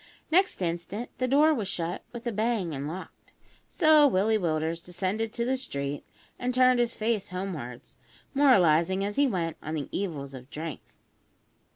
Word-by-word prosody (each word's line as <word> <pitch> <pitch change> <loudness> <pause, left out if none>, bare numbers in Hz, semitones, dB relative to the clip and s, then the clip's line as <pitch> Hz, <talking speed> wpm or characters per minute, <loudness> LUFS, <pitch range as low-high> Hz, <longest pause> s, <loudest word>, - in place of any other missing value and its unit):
Next 370 - +3
instant 175 +7 -3
the 255 - +1
door 295 +4 +5
was 220 -9 -2
shut 175 -2 -3
with 235 0 -8
a 240 - 0
bang 215 -5 0
and 140 +1 -4
locked; 180 +5 -9 0.3
so 310 -3 +5
Willie 215 -1 +2
Willders 165 -1 -1
descended 190 +5 -2
to 235 -1 -1
the 260 +2 +1
street, 145 - -4 0.4
and 250 0 -1
turned 255 -1 +5
his 240 -1 +1
face 220 -2 -1
homewards, 170 -10 -6 0.4
moralising 190 - +4
as 205 0 -3
he 285 0 +4
went 170 -8 -2
on 155 +1 -4
the 145 -3 -4
evils 150 -8 -4
of 130 0 -10
drink. 160 0 -6
195 Hz, 165 wpm, -28 LUFS, 165-245 Hz, 0.4 s, door